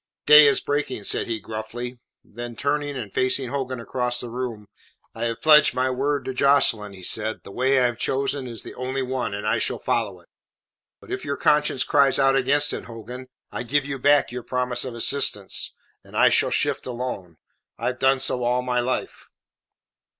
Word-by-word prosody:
"Day 150 Hz, 0 st, +9 dB
is 140 Hz, -, +4 dB
breaking," 145 Hz, -6 st, -3 dB
said -, -, -1 dB
he 115 Hz, -2 st, -2 dB
gruffly. 115 Hz, +4 st, -7 dB, 0.2 s
Then 120 Hz, +1 st, -8 dB
turning, 145 Hz, +2 st, -1 dB
and 110 Hz, -6 st, -7 dB
facing 130 Hz, 0 st, +1 dB
Hogan 130 Hz, -2 st, -3 dB
across 125 Hz, +1 st, -1 dB
the 120 Hz, -, -5 dB
room, 120 Hz, -4 st, -5 dB, 0.5 s
"I 115 Hz, +1 st, -4 dB
have 115 Hz, -1 st, -4 dB
pledged 155 Hz, -1 st, +6 dB
my 130 Hz, +1 st, +1 dB
word 140 Hz, +1 st, -1 dB
to 130 Hz, -, -3 dB
Jocelyn," 125 Hz, -6 st, +3 dB
he 95 Hz, -1 st, -12 dB
said. 110 Hz, +4 st, -1 dB
"The -, -, -11 dB
way 130 Hz, +5 st, +2 dB
I 125 Hz, -, +3 dB
have 120 Hz, -1 st, -2 dB
chosen 135 Hz, 0 st, -1 dB
is 115 Hz, -3 st, -6 dB
the -, -, -8 dB
only 130 Hz, +1 st, -3 dB
one, 125 Hz, -5 st, -3 dB
and 105 Hz, +1 st, -5 dB
I 110 Hz, -, +1 dB
shall -, -, 0 dB
follow 100 Hz, -6 st, -2 dB
it. 85 Hz, -, -23 dB, 0.7 s
But -, -, -14 dB
if -, -, -4 dB
your 140 Hz, 0 st, -3 dB
conscience 150 Hz, -4 st, +2 dB
cries 140 Hz, -2 st, +3 dB
out 135 Hz, 0 st, +3 dB
against 145 Hz, +3 st, +2 dB
it, -, -, -5 dB
Hogan, 120 Hz, +3 st, -9 dB, 0.2 s
I -, -, -4 dB
give 135 Hz, +4 st, 0 dB
you 140 Hz, -1 st, -5 dB
back 145 Hz, +1 st, +3 dB
your 125 Hz, 0 st, -5 dB
promise 125 Hz, 0 st, -2 dB
of 125 Hz, -2 st, -6 dB
assistance, 115 Hz, -5 st, +1 dB, 0.3 s
and -, -, -9 dB
I -, -, +6 dB
shall -, -, +3 dB
shift -, -, 0 dB
alone. 120 Hz, -9 st, -5 dB, 0.4 s
I -, -, -6 dB
have 125 Hz, 0 st, -2 dB
done 135 Hz, 0 st, +3 dB
so 125 Hz, -1 st, -1 dB
all 125 Hz, +1 st, +1 dB
my 125 Hz, -1 st, 0 dB
life." 125 Hz, +1 st, -3 dB
125 Hz, 195 wpm, -23 LUFS, 115-135 Hz, 0.7 s, Day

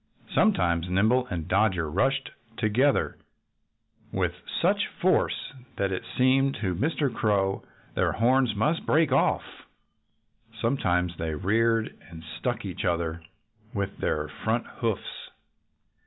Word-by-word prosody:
Sometimes 85 Hz, -, +2 dB
Nimble 110 Hz, +7 st, +3 dB
and 85 Hz, -6 st, -4 dB
Dodger 95 Hz, -4 st, +2 dB
rushed 135 Hz, -, 0 dB, 0.3 s
together 125 Hz, +6 st, +2 dB, 0.9 s
with -, -, 0 dB, 0.3 s
such 200 Hz, +4 st, +2 dB
force 185 Hz, -4 st, +1 dB, 0.2 s
that 100 Hz, -1 st, 0 dB
it 95 Hz, -, -2 dB, 0.2 s
seemed 135 Hz, +2 st, +3 dB
to 95 Hz, -4 st, -2 dB
Mr. 140 Hz, -, 0 dB
Crow 100 Hz, -3 st, +1 dB, 0.3 s
their -, -, +1 dB
horns 125 Hz, 0 st, +3 dB
must 150 Hz, +11 st, +1 dB
break 155 Hz, -3 st, +3 dB
off. 135 Hz, -, +3 dB, 1.2 s
Sometimes 90 Hz, -8 st, +1 dB
they 80 Hz, -1 st, -2 dB
reared 115 Hz, +6 st, +1 dB
and 80 Hz, -1 st, -10 dB, 0.2 s
struck 120 Hz, +3 st, -2 dB
each 95 Hz, -3 st, -5 dB
other 85 Hz, -2 st, -1 dB, 0.5 s
with 100 Hz, -1 st, -2 dB
their 75 Hz, 0 st, -1 dB
front 110 Hz, +10 st, -2 dB
hoofs. 115 Hz, -5 st, -3 dB
110 Hz, 115 wpm, -27 LUFS, 90-130 Hz, 1.2 s, Nimble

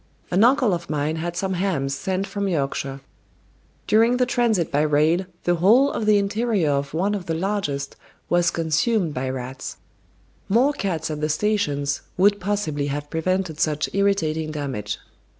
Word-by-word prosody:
An 185 Hz, +4 st, +4 dB
uncle 250 Hz, -4 st, +4 dB
of 170 Hz, -1 st, -4 dB
mine 150 Hz, +1 st, -1 dB
had 170 Hz, +1 st, -4 dB
some 190 Hz, -1 st, -1 dB
hams 175 Hz, -7 st, -1 dB
sent 190 Hz, +6 st, -2 dB
from 200 Hz, 0 st, -3 dB
Yorkshire; 140 Hz, -4 st, -2 dB, 0.8 s
during 230 Hz, +3 st, +4 dB
the 250 Hz, -, +3 dB
transit 235 Hz, -8 st, +1 dB
by 145 Hz, +1 st, +2 dB
rail 155 Hz, +4 st, +2 dB, 0.2 s
the 175 Hz, -, +2 dB
whole 235 Hz, +11 st, +5 dB
of 215 Hz, -, -3 dB
the 210 Hz, -1 st, +6 dB
interior 205 Hz, -4 st, +1 dB
of 140 Hz, +1 st, -2 dB
one 195 Hz, +5 st, +1 dB
of 195 Hz, -4 st, -4 dB
the 165 Hz, -, -1 dB
largest 160 Hz, -7 st, -2 dB, 0.3 s
was 175 Hz, -1 st, +3 dB
consumed 165 Hz, +3 st, 0 dB
by 130 Hz, 0 st, -2 dB
rats. 130 Hz, 0 st, -6 dB, 0.7 s
More 250 Hz, +8 st, +4 dB
cats 165 Hz, -, -2 dB
at 150 Hz, -1 st, -4 dB
the 155 Hz, -, 0 dB
stations 150 Hz, -6 st, 0 dB, 0.2 s
would 205 Hz, +2 st, +4 dB
possibly 180 Hz, -8 st, -1 dB
have 145 Hz, +1 st, -4 dB
prevented 175 Hz, -1 st, -1 dB
such 150 Hz, -1 st, 0 dB
irritating 165 Hz, -6 st, +1 dB
damage. 135 Hz, -9 st, -4 dB
175 Hz, 160 wpm, -23 LUFS, 150-200 Hz, 0.8 s, the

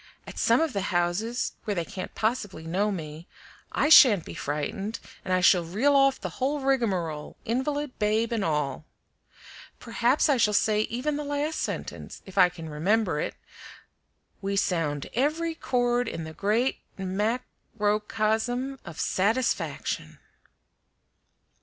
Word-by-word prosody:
At -, -, -8 dB
some -, -, +4 dB
of 320 Hz, -5 st, 0 dB
the 200 Hz, -, -1 dB
houses 180 Hz, +8 st, 0 dB
where 205 Hz, -, -1 dB
they 170 Hz, -2 st, -1 dB
can't 185 Hz, -, -7 dB
possibly 215 Hz, -7 st, -2 dB
know 195 Hz, +6 st, 0 dB
me 160 Hz, -2 st, -6 dB, 0.4 s
I -, -, +1 dB
shan't 225 Hz, -, +8 dB
be -, -, -8 dB
frightened, 195 Hz, +10 st, -3 dB, 0.2 s
and 185 Hz, -, -4 dB
I 185 Hz, 0 st, +3 dB
shall 180 Hz, -1 st, +5 dB
reel 220 Hz, +13 st, +2 dB
off 275 Hz, -1 st, +4 dB
the -, -, -6 dB
whole 285 Hz, +3 st, +1 dB
rigmarole, 195 Hz, -, -1 dB
invalid, 275 Hz, +4 st, -2 dB
babe, 220 Hz, +2 st, +1 dB
and 225 Hz, -3 st, 0 dB
all. 150 Hz, -2 st, -1 dB, 0.9 s
Perhaps 240 Hz, +5 st, +2 dB
I 285 Hz, -3 st, +3 dB
shall 210 Hz, -3 st, +3 dB
say 210 Hz, 0 st, +3 dB
even 285 Hz, +5 st, -2 dB
the 295 Hz, -, -3 dB
last 290 Hz, +2 st, -2 dB
sentence, -, -, -5 dB
if 190 Hz, -, -12 dB
I 180 Hz, -2 st, +6 dB
can 165 Hz, -2 st, -9 dB
remember 180 Hz, +3 st, +1 dB
it: -, -, -3 dB, 1.1 s
'We 200 Hz, 0 st, -2 dB
sound 165 Hz, -7 st, 0 dB
every 315 Hz, +6 st, 0 dB
chord 245 Hz, -5 st, 0 dB
in 165 Hz, -, -4 dB
the 160 Hz, 0 st, -8 dB
great 220 Hz, +9 st, 0 dB, 0.2 s
mac 210 Hz, +6 st, -1 dB, 0.3 s
ro 210 Hz, 0 st, +2 dB
cosm 225 Hz, +5 st, -1 dB
of 170 Hz, -3 st, -9 dB
satisfaction." 220 Hz, +7 st, -1 dB
215 Hz, 145 wpm, -27 LUFS, 180-255 Hz, 1.1 s, shan't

